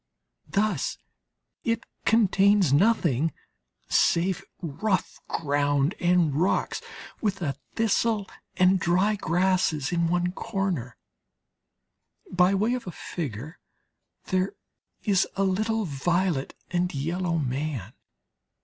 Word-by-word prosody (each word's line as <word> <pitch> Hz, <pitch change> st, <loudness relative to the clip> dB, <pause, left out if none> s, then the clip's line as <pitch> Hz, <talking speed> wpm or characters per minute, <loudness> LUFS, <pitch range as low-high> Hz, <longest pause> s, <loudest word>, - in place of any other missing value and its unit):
Thus 200 Hz, -7 st, 0 dB, 0.7 s
it 230 Hz, -1 st, 0 dB, 0.2 s
contains 200 Hz, -, +4 dB
nothing 165 Hz, -, +3 dB, 0.5 s
save 175 Hz, +1 st, +2 dB, 0.2 s
rough 185 Hz, +5 st, -2 dB
ground 145 Hz, +1 st, +1 dB
and 175 Hz, -4 st, +3 dB
rocks 170 Hz, +7 st, 0 dB, 0.4 s
with 200 Hz, -3 st, 0 dB
a 140 Hz, -3 st, -1 dB, 0.2 s
thistle 225 Hz, -2 st, +1 dB, 0.3 s
and 185 Hz, +1 st, +5 dB
dry 185 Hz, +5 st, +2 dB
grasses 175 Hz, -5 st, +1 dB
in 170 Hz, -1 st, +1 dB
one 175 Hz, +1 st, +1 dB
corner; 190 Hz, -, -3 dB, 1.3 s
by 180 Hz, +2 st, +4 dB
way 215 Hz, +5 st, +1 dB
of 250 Hz, -5 st, -4 dB
a -, -, -3 dB
figure 150 Hz, -, -6 dB, 0.7 s
there 185 Hz, +1 st, 0 dB, 0.5 s
is 195 Hz, -4 st, +3 dB
a 195 Hz, -, +1 dB
little 215 Hz, +3 st, 0 dB
violet 170 Hz, 0 st, 0 dB, 0.2 s
and 180 Hz, 0 st, +1 dB
yellow 170 Hz, +4 st, -1 dB
man. 130 Hz, -, -3 dB
180 Hz, 100 wpm, -26 LUFS, 155-195 Hz, 1.3 s, and